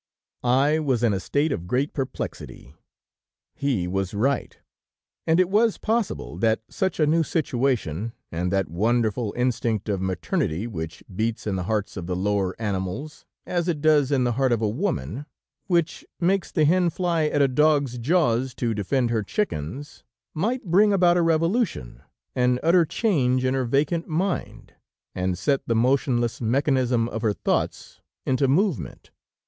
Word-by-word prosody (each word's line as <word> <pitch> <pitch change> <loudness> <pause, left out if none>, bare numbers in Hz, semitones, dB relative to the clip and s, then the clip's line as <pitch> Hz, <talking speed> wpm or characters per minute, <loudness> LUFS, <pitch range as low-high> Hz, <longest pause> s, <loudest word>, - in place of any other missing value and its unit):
"I 135 +5 +3
was 130 -6 0
in 115 -3 +3
a 95 - -1
state 145 +10 0
of 85 - -3
great 130 - 0
perplexity. 130 - -6 0.8
He 125 -11 -1
was 95 +1 -2
right, 135 +7 0 0.7
and 165 +2 +4
it 185 - +4
was 215 +3 +2
possible 225 -1 -2
that 110 -1 +1
such 190 -4 -2
a 155 - +4
new 160 +3 +3
situation, 120 - -1 0.2
and 90 +2 -2
that 95 -1 +1
wonderful 110 +4 0
instinct 115 -4 0
of 100 -3 -1
maternity 95 0 -1
which 80 -8 -6
beats 110 +2 -2
in 105 -3 -1
the 90 -2 -3
hearts 105 0 -2
of 85 -2 -5
the 90 - -2
lower 95 0 -1
animals, 105 +7 -4 0.2
as 175 -1 -1
it 165 -4 0
does 145 -2 +3
in 135 -3 +2
the 120 - +1
heart 130 +2 +1
of 115 - +2
a 110 - 0
woman, 115 - -3 0.4
which 170 -3 0 0.2
makes 185 +2 +1
the 155 - +2
hen 175 +3 +3
fly 170 -2 0
at 145 -1 +2
a - - +4
dog's 140 -2 +2
jaws 130 -3 +1
to 115 -2 -1
defend 120 +4 0
her 110 -2 +1
chickens, 130 - -4 0.3
might 230 +11 -1
bring 200 +5 +4
about 180 -3 +4
a 175 - +3
revolution, 165 - 0 0.3
an 125 0 +2
utter 170 +1 +5
change 130 - +1
in 130 - +1
her 130 -1 0
vacant 145 +7 0
mind, 175 +4 -3 0.4
and 90 -1 -1
set 140 +6 +1
the 115 - +1
motionless 120 -1 +1
mechanism 125 -1 +1
of 110 - -4
her 110 -2 +1
thoughts - - -2 0.2
into 130 +1 +2
movement. 170 - -1
130 Hz, 160 wpm, -24 LUFS, 110-160 Hz, 0.8 s, utter